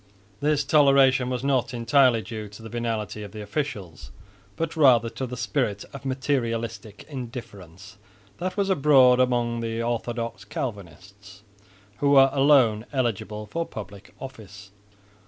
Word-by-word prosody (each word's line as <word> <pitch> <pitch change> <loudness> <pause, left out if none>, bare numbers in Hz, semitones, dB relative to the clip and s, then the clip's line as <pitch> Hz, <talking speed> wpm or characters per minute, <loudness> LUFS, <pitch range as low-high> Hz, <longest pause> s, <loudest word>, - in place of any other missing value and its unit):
This 150 0 +1
toleration 135 -3 +4
was 125 0 -3
not 130 -3 0
entirely 120 -1 +3
due 110 -2 -7
to 105 +2 -13
the 110 - -8
venality 115 -2 -3
of 105 0 -9
the 105 -1 -7
officials, 105 - -5 0.5
but 165 0 -3
rather 125 -7 +4
to 130 - -5
the 125 +1 -7
spirit 105 -2 -2
of 140 - -9
materialistic 115 -5 -3
indifference 105 - -9 0.4
that 185 +3 -4
was 195 -1 +1
abroad 135 -6 +5
among 120 -2 +1
the 115 0 -3
orthodox 115 -3 -3
Calvinists, 100 - -8 0.5
who 140 - +1
were 135 -1 +6
alone 135 -6 +4
eligible 110 -5 -2
for 165 +11 -3
public 100 - -10
office. 105 -6 -11
120 Hz, 135 wpm, -25 LUFS, 105-135 Hz, 0.5 s, were